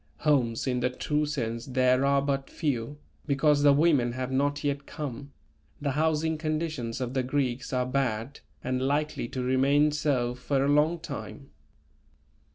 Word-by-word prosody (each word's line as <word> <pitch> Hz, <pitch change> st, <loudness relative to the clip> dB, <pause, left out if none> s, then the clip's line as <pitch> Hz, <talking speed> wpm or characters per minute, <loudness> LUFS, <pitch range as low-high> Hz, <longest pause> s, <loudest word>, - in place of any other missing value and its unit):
Homes 130 Hz, -7 st, +2 dB
in 125 Hz, -2 st, 0 dB
the 125 Hz, +1 st, +1 dB
true 150 Hz, +4 st, -1 dB
sense 115 Hz, -5 st, -3 dB
there 130 Hz, 0 st, +2 dB
are 140 Hz, 0 st, +3 dB
but 140 Hz, -1 st, -1 dB
few, 145 Hz, -3 st, -2 dB, 0.3 s
because 145 Hz, +1 st, +3 dB
the 145 Hz, 0 st, +6 dB
women 140 Hz, -5 st, +3 dB
have 130 Hz, +1 st, -4 dB
not 145 Hz, +2 st, 0 dB
yet 140 Hz, -1 st, -2 dB
come; 140 Hz, -2 st, -6 dB, 0.5 s
the 145 Hz, -1 st, -1 dB
housing 160 Hz, +2 st, 0 dB
conditions 155 Hz, -6 st, -2 dB
of 125 Hz, -1 st, -3 dB
the 130 Hz, -, +1 dB
Greeks 130 Hz, -1 st, -2 dB
are 125 Hz, -1 st, +1 dB
bad 130 Hz, 0 st, -2 dB, 0.2 s
and 130 Hz, 0 st, -1 dB
likely 145 Hz, -1 st, -1 dB
to 130 Hz, +1 st, -4 dB
remain 140 Hz, +4 st, +3 dB
so 140 Hz, -5 st, 0 dB
for 135 Hz, +2 st, 0 dB
a -, -, +1 dB
long 150 Hz, +4 st, +3 dB
time. 145 Hz, -3 st, -8 dB
140 Hz, 160 wpm, -28 LUFS, 125-150 Hz, 0.5 s, the